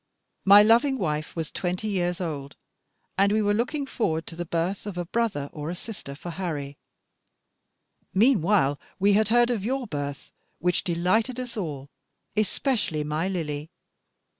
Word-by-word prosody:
My 200 +1 +9
loving 240 +5 +4
wife 155 -6 -2
was 160 -2 -3
twenty 180 +4 -2
years 180 -3 0
old, 145 -6 -4 0.6
and 200 +1 +5
we 215 - +3
were 205 0 +3
looking 250 +6 -1
forward 160 -11 -1
to 165 - -9
the 175 +1 -4
birth 175 +5 -1
of 195 -3 -5
a 175 - -2
brother 200 -8 -1
or 150 +1 -4
sister 180 -8 -8
for 170 +4 -7
Harry. 150 -6 -4 1.3
Meanwhile 195 - +3 0.2
we 200 +1 +4
had 215 +1 +4
heard 240 +2 +4
of 220 -5 -1
your 260 +3 -1
birth, 145 -5 -5 0.3
which 180 +1 +1
delighted 205 +9 +1
us 250 -1 -5
all, 145 -9 -5 0.4
especially 215 - 0
my 155 +4 -1
Lily. 155 -5 -3
185 Hz, 150 wpm, -26 LUFS, 155-220 Hz, 1.3 s, My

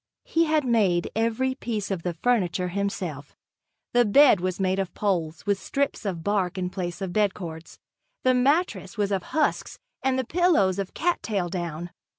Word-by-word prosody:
He 330 +1 +2
had 310 -2 +1
made 200 -8 +2
every 230 +4 +1
piece 220 -6 -4
of 190 -3 -2
the 175 0 -3
furniture 180 -4 +1
himself. 175 -7 -4 0.6
The 245 0 +5
bed 240 0 +6
was 185 +1 -2
made 190 0 +1
of 190 -2 -3
poles, 170 -6 -1
with 200 -2 0
strips 280 -5 -2
of 175 -5 -3
bark 195 -2 0
in 180 -1 -2
place 180 +1 -4
of 185 -2 -3
bedcords, 175 -6 -2 0.5
the 255 - +4
mattress 250 - +1
was 205 -1 0
of 195 -2 +1
husks 310 - -1 0.2
and 265 0 +1
the 260 - -1
pillows 280 - +2
of 195 -1 -4
cat 350 +1 0
tail 195 -5 -2
down. 175 -1 -4
200 Hz, 170 wpm, -25 LUFS, 180-245 Hz, 0.6 s, bed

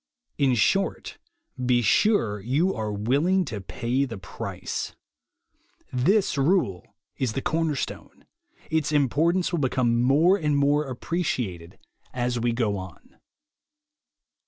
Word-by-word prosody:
In 135 -3 +3
short, 195 - 0 0.4
be 125 -1 +2
sure 115 - +2
you 145 - +1
are 110 -1 -3
willing 140 - +1
to 110 -7 -5
pay 120 +8 -1
the 120 -6 -5
price. 95 - -5 1.0
This 155 - +2
rule 135 - 0 0.2
is 125 -5 -1
the 135 - -2
corner 160 -2 0
stone. - - -6 0.5
Its 155 -2 +1
importance 155 +6 +2
will 170 - 0
become 125 -3 +1
more 155 +10 +4
and 150 -5 0
more 145 +2 +2
appreciated 120 - -3 0.4
as 125 -1 -1
we 120 +1 +1
go 115 -4 0
on. 95 -3 -11
130 Hz, 120 wpm, -25 LUFS, 115-160 Hz, 1.0 s, more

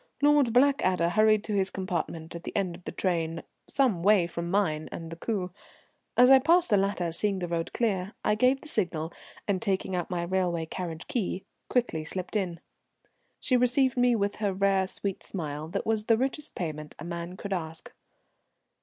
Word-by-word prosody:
Lord 290 -4 +4
Blackadder 230 - +3
hurried 215 +2 +4
to 215 - -4
his 195 -1 +1
compartment 170 -4 -4
at 170 0 -7
the - - -7
end 190 -3 0
of 175 +1 -13
the - - -4
train 165 -3 -1 0.3
some 245 -11 +2
way 200 -1 +5
from 170 0 -4
mine 165 -6 0
and 165 -1 -7
the - - -5
coupé. 185 0 -3 0.7
As 250 +2 +7
I 265 - +9
passed 335 +3 +3
the - - +6
latter, 195 -3 0
seeing 195 +4 0
the 180 -1 -3
road 165 -1 -2
clear, 200 -4 -1
I - - +4
gave 255 +5 +3
the - - -10
signal, 175 - -1 0.3
and, 195 -3 0
taking 190 -3 -1
out 175 -2 -2
my 175 -1 -1
railway 175 -2 0
carriage 165 -1 -6
key, 215 -8 -2 0.2
quickly 235 -11 0
slipped 185 +6 -5
in. 180 -5 -1 0.8
She 255 - +1
received 250 +1 +3
me 245 -1 +4
with 200 -1 -1
her 205 -3 -1
rare 195 -1 +2
sweet 195 0 -4
smile, 155 -4 -5
that 195 +4 -3
was 220 -1 0
the 225 0 +4
richest 270 +4 -2
payment 155 -3 -5
a - - -9
man 170 +1 -5
could 200 0 -4
ask. 160 -3 -4
190 Hz, 190 wpm, -28 LUFS, 170-220 Hz, 0.8 s, I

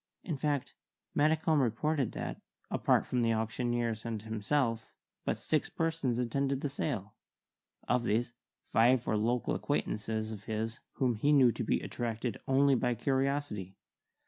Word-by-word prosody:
In 175 - -2
fact, 145 -1 -1 0.4
Maddicombe 155 0 +3
reported 135 +3 0
that, - - -5 0.3
apart - - +3
from 125 - 0
the 115 -1 +3
auctioneers 115 0 -1
and 115 -2 -3
himself, 110 +2 0 0.4
but - - 0
six 155 - 0
persons 160 -7 0
attended 135 +3 0
the 145 - -1
sale. 120 -8 -3 0.7
Of 125 0 +2
these, 120 +2 +1 0.3
five 120 +2 +4
were - - +1
local 115 +3 +1
acquaintances 110 +1 -1
of 105 -2 -8
his 110 +2 -3
whom 125 -2 +1
he 145 +7 +2
knew 135 -5 +6
to - - -3
be - - +1
attracted 115 -1 -3
only 135 +1 +4
by 125 -1 +1
curiosity. 130 -6 -1
120 Hz, 145 wpm, -32 LUFS, 110-140 Hz, 0.7 s, knew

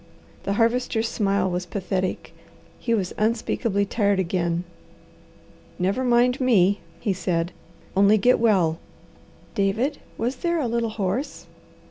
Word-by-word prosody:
The 200 - 0
Harvester's 230 +1 +1
smile 200 -4 +1
was 180 0 -3
pathetic. 185 -1 -3 0.5
He 230 - +1
was 190 -4 -2
unspeakably 215 -1 0
tired 200 -1 +1
again. 175 -2 0 1.1
"Never 195 +8 0
mind 250 +1 +3
me!" 205 -6 +4 0.2
he 200 - 0
said. 175 -2 -1 0.4
"Only 200 +2 +5
get 245 +5 +4
well." 185 -8 +3 0.7
"David, 220 +9 0 0.2
was 245 +3 -2
there 340 +3 0
a 270 - 0
little 230 0 0
horse?" 215 +6 -3
205 Hz, 120 wpm, -24 LUFS, 185-235 Hz, 1.1 s, Only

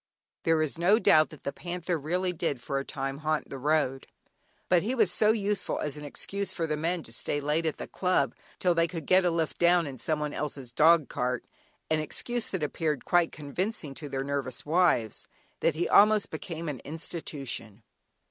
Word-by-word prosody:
There 165 -1 +3
is 155 +1 -4
no 190 +5 +5
doubt 155 -8 +5
that 155 - -13
the 140 - -3
panther 175 +2 -3
really 180 +4 -1
did 155 -6 -2
for 135 +3 -2
a - - -3
time 135 0 -4
haunt 155 0 -1
the 135 - -5
road, 145 -2 +1 0.6
but 180 -2 +4
he 235 +8 -1
was 220 -7 +3
so 210 +3 +4
useful 210 -2 -1
as 150 -1 -3
an 150 - -8
excuse 200 +7 -3
for 165 - -2
the 155 -1 -1
men 165 +2 -1
to - - -11
stay 145 - -1
late 150 +3 0
at 155 - -2
the - - -6
club 180 -9 +1 0.2
till 180 -1 +2
they 165 0 +2
could 165 -3 -6
get 185 +3 +5
a - - +4
lift 165 -2 -1
down 175 0 +4
in 135 -3 -7
someone 150 +2 -1
else's 135 -4 -4
dog 160 +1 +5
cart 125 0 -2 0.5
(an 155 - +3
excuse 240 +9 -1
that 190 -5 -3
appeared 150 -1 -1
quite 175 -2 +3
convincing 155 +2 -4
to 145 +1 -7
their 135 0 -2
nervous 140 -3 -3
wives) 155 - +2 0.3
that 165 - +2
he 170 +2 0
almost 210 0 +5
became 165 -1 -5
an 145 -4 -3
institution. 140 - -5
155 Hz, 195 wpm, -28 LUFS, 140-175 Hz, 0.6 s, no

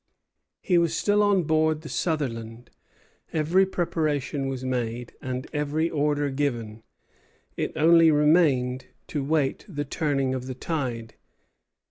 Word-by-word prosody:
He 180 -2 +3
was 170 -1 +1
still 205 0 +2
on 200 -3 +3
board 155 0 +1
the 155 - -9
"Sutherland." 120 -9 -3 0.6
Every 170 +5 +3
preparation 155 -6 -1
was 130 -1 -4
made, 120 -1 -3
and 130 +1 -4
every 150 +2 -1
order 145 -1 0
given; 120 -6 -2 0.7
it - - -2
only 165 +1 +6
remained 150 -5 +3 0.2
to 145 -3 -2
wait 145 -1 0
the 145 -5 -4
turning 135 -2 -1
of 130 -1 -4
the 130 - -5
tide. 125 -6 -4
145 Hz, 125 wpm, -25 LUFS, 130-160 Hz, 0.7 s, only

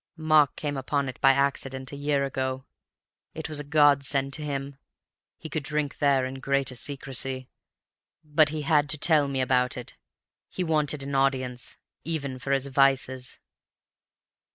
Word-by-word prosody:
Mark 155 -3 +3
came 145 -2 -3
upon 140 +1 -1
it 130 - -8
by 135 - +7
accident 135 -1 -1
a - - -7
year 145 0 0
ago. 130 -1 -3 0.7
It 160 - -5
was 155 -2 +1
a - - -4
godsend 140 -2 +3
to 155 - -1
him; 140 -2 -4 0.6
he - - -8
could 155 0 -3
drink 150 0 -3
there 140 -2 +3
in 130 +1 -6
greater 140 -1 0
secrecy. 130 -1 0 0.7
But 150 0 +3
he 155 0 -4
had 150 -1 +2
to 150 - -1
tell 150 -1 +3
me 135 -1 -1
about 125 -1 +1
it. 125 - -9 0.5
He 185 - -3
wanted 150 -3 +1
an 140 +1 -5
audience, 130 -2 -1 0.3
even 140 -5 -4
for 135 - -4
his 135 -1 +1
vices.) 135 -2 +1
140 Hz, 155 wpm, -26 LUFS, 130-150 Hz, 0.7 s, by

